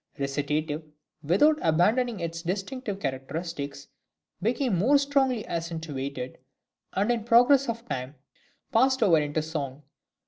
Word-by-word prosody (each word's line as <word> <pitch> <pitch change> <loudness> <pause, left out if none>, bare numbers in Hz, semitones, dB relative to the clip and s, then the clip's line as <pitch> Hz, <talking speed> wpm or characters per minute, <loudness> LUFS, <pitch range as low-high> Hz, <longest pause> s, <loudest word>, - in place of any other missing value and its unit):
Recitative, 145 +2 -1 0.4
without 290 - +4
abandoning 210 +7 +2
its 165 0 -4
distinctive 195 +4 -3
characteristics, 140 0 -4 0.5
became 240 +2 +1
more 245 +12 +4
strongly 270 -5 +1
accentuated, 150 -6 -4 0.5
and 205 +5 +1
in 235 -2 -1
process 245 +4 +5
of 230 +1 -4
time 130 - -4 0.6
passed 260 +2 +3
over 170 -6 +5
into 150 +1 -1
song. 150 -3 -5
170 Hz, 110 wpm, -27 LUFS, 150-240 Hz, 0.6 s, process